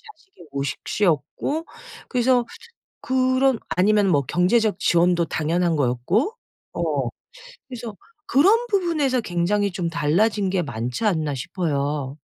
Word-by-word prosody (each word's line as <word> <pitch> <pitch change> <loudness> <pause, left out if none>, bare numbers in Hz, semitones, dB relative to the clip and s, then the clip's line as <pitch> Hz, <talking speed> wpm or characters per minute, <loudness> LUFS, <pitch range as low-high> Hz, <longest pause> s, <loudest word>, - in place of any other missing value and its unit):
자식의 325 - -19
모식 140 -2 -3
시었고 205 - -1 0.4
그래서 250 -1 +2 0.6
그런 260 0 +2
아니면 205 +2 +3
뭐 145 -6 +3
경제적 200 - +1
지원도 175 0 +3
당연한 165 +2 0
거였고 145 - 0 0.4
어 - - -1 0.6
그래서 235 -4 -7 0.3
그런 420 - +4
부분에서 315 - +1
굉장히 200 +2 0
좀 175 -2 -2
달라진 185 +6 +1
게 185 -1 0
많지 120 - -4
않나 155 -8 0
싶어요. 145 -2 -2
185 Hz, 265 characters per minute, -23 LUFS, 155-250 Hz, 0.6 s, 그런